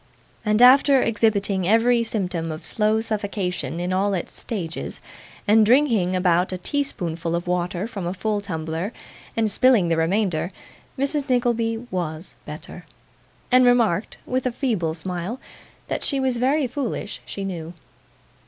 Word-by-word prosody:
And 215 +2 +3
after 270 +2 +7
exhibiting 205 -5 +1
every 230 +3 +4
symptom 180 -7 -2
of 155 - -7
slow 215 0 +1
suffocation 195 - -3
in 180 +1 -1
all 195 +1 +1
its 175 - -4
stages, 175 -8 -4 0.5
and 215 +1 +6
drinking 225 -6 +3
about 180 0 +2
a 185 - -3
tea 285 +10 -1
spoonful 170 - -3
of 170 - -3
water 180 +2 -1
from 195 -6 -5
a 175 - -2
full 210 +2 -1
tumbler, 165 +2 -4 0.4
and 220 -2 +2
spilling 235 -7 +4
the 165 - +1
remainder, 175 0 0 0.5
Mrs. 280 +1 0
Nickleby 235 -2 +1
WAS 170 -2 -3
better, - - -9 0.6
and 255 0 +6
remarked, 230 -6 +2
with 255 0 -1
a - - 0
feeble 215 - -1
smile, 180 +7 -4 0.5
that - - -3
she 275 - +1
was 260 -2 0
very 270 +4 +2
foolish, 245 -5 -4
she 195 - -6
knew. 170 -3 -6
205 Hz, 145 wpm, -23 LUFS, 175-240 Hz, 0.6 s, after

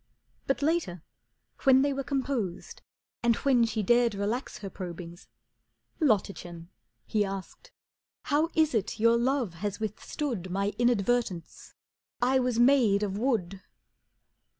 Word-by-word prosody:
But 270 +1 0
later 290 - 0 0.6
when 265 -1 +5
they 285 0 +1
were 275 0 -3
composed 260 -9 -3 0.4
and 235 -1 +3
when 250 -3 +3
She 220 -1 -2
dared 240 +1 +3
relax 210 +6 -3
her 200 -2 -7
probings, 175 -2 -8 0.7
"Lottachen," 185 - -1 0.4
He 210 -1 +1
asked, 195 - -7 0.5
"how 310 +2 +1
is 315 -3 +3
it 215 -1 -1
your 230 +1 +5
love 245 -4 0
has 200 +5 -4
withstood 215 - -4
My 200 +3 -1
inadvertence? 240 -6 0 0.4
I 260 +2 +3
was 250 -2 0
made 240 -5 +4
of 195 -2 -2
wood." 195 -7 -1
230 Hz, 125 wpm, -28 LUFS, 195-265 Hz, 0.7 s, when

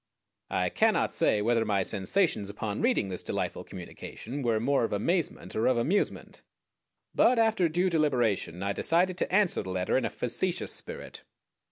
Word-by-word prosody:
I - - 0
cannot - - +2
say 105 - +2
whether 115 0 +2
my 100 -3 +1
sensations 105 - +1
upon 105 0 -4
reading 235 - +1
this 90 - -1
delightful - - -3
communication 110 +8 -8
were 115 -4 +1
more 135 +3 +1
of - - -1
amazement 165 - -1
or 110 - +1
of 130 - +3
amusement, 165 +13 -1 0.7
but 250 - +4
after 220 -6 +3
due 175 +4 +1
deliberation 120 - 0
I 100 0 -1
decided 175 - +2
to - - -1
answer 190 -1 +2
the 95 - -8
letter 95 +6 0
in - - -3
a - - 0
facetious 180 +9 -1
spirit. 485 0 -6
125 Hz, 165 wpm, -28 LUFS, -, 0.7 s, but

